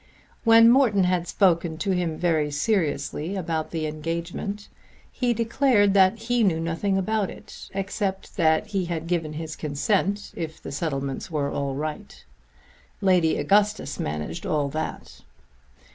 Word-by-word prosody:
When 230 Hz, 0 st, +7 dB
Morton 235 Hz, -6 st, +5 dB
had 180 Hz, -1 st, +1 dB
spoken 170 Hz, -4 st, +2 dB
to 195 Hz, +4 st, -1 dB
him 175 Hz, -4 st, -1 dB
very 160 Hz, -4 st, +1 dB
seriously 155 Hz, 0 st, -1 dB
about 160 Hz, -4 st, -2 dB
the 160 Hz, -2 st, -3 dB
engagement 170 Hz, +6 st, -4 dB, 0.4 s
he 245 Hz, -2 st, 0 dB
declared 230 Hz, -2 st, +3 dB
that 190 Hz, +2 st, +5 dB
he 235 Hz, +1 st, 0 dB
knew 175 Hz, -6 st, +2 dB
nothing 165 Hz, +4 st, -1 dB
about 205 Hz, +1 st, 0 dB
it, -, -, -11 dB
except 195 Hz, 0 st, -3 dB
that 160 Hz, +1 st, +3 dB
he 200 Hz, -3 st, -2 dB
had 165 Hz, -2 st, -3 dB
given 165 Hz, -3 st, -1 dB
his 155 Hz, 0 st, -5 dB
consent 195 Hz, +7 st, -1 dB
if 160 Hz, -1 st, -5 dB
the -, -, -8 dB
settlements 140 Hz, -3 st, -3 dB
were 145 Hz, -3 st, -1 dB
all 140 Hz, -1 st, -2 dB
right. 150 Hz, +2 st, -6 dB, 0.7 s
Lady 180 Hz, -4 st, +3 dB
Augustus 210 Hz, +1 st, +1 dB
managed 75 Hz, +2 st, -4 dB
all 145 Hz, -2 st, 0 dB
that. 155 Hz, +3 st, -5 dB
175 Hz, 140 wpm, -25 LUFS, 155-200 Hz, 0.7 s, When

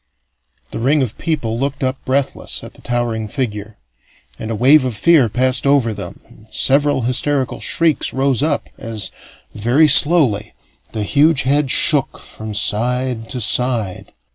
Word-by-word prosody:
The -, -, -5 dB
ring 135 Hz, +4 st, +2 dB
of 115 Hz, -4 st, -6 dB
people 120 Hz, -9 st, -2 dB
looked 140 Hz, 0 st, -3 dB
up 130 Hz, 0 st, -3 dB
breathless 135 Hz, +1 st, -2 dB
at -, -, -11 dB
the -, -, -18 dB
towering 120 Hz, -3 st, -2 dB
figure, 105 Hz, -3 st, -5 dB, 0.6 s
and 110 Hz, -, -6 dB
a 115 Hz, -, -2 dB
wave 135 Hz, +6 st, +5 dB
of 125 Hz, -5 st, -4 dB
fear 150 Hz, -2 st, +3 dB
passed 130 Hz, +5 st, +1 dB
over 135 Hz, -5 st, +2 dB
them -, -, -8 dB
and 110 Hz, -, -20 dB
several 140 Hz, +2 st, +1 dB
hysterical 130 Hz, +2 st, -1 dB
shrieks 165 Hz, -3 st, 0 dB
rose 135 Hz, -1 st, 0 dB
up 150 Hz, -1 st, -1 dB
as, 110 Hz, -3 st, -4 dB, 0.4 s
very 120 Hz, +9 st, +2 dB
slowly, 140 Hz, -9 st, +4 dB, 0.4 s
the 110 Hz, -, -3 dB
huge 145 Hz, +6 st, +2 dB
head 140 Hz, +1 st, +1 dB
shook 145 Hz, +1 st, +1 dB
from 110 Hz, -1 st, -9 dB
side 120 Hz, +2 st, -1 dB
to 130 Hz, -, -4 dB
side. 115 Hz, -4 st, 0 dB
130 Hz, 150 wpm, -17 LUFS, 110-140 Hz, 0.6 s, wave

